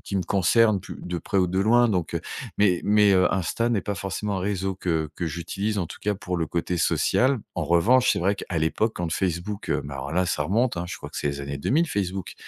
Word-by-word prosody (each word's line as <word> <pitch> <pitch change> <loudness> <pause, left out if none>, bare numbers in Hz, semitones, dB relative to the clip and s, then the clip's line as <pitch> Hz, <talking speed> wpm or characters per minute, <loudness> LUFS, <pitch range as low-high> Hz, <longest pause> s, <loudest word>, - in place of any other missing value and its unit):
qui 100 - 0
me 95 - +1
concernent 105 +3 +3
pu - - -9
de 90 0 -4
près 100 +3 -1
ou 90 - +3
de 90 +2 -1
loin, 120 +4 +4
donc 90 -6 -1
heu, - - 0 0.4
mais 95 -4 +3
mais 105 -1 +5
heu, 90 -1 +3
Insta 95 +6 0
n'est 110 -5 +1
pas 100 +2 -3
forcément 100 +2 -3
un - - -2
réseau 95 0 -1
que 80 -4 -1
que 90 - -3
j'utilise, 95 +6 -3
en 90 - -1
tout - - -9
cas, 105 0 0
pour 90 -3 -4
le 80 - -1
côté 85 +2 -2
social, 130 - +2 0.2
en 85 - -2
revanche, 105 +11 +4
c'est - - -1
vrai 95 +4 +2
qu'à 90 -3 -4
l'époque, 105 +8 +1
quand 85 -2 -2
Facebook, 95 +3 -2
heu, - - +1
ben, 70 -1 -7
voilà, 80 +7 -1
ça 75 -3 0
remonte, 115 +7 +1
hein, 85 - -2
je - - -6
crois - - -8
que - - -11
c'est - - -1
les 70 0 -3
années 70 0 -4
2000 155 - +1
Facebook, 95 - -3
95 Hz, 250 wpm, -25 LUFS, 85-105 Hz, 0.4 s, mais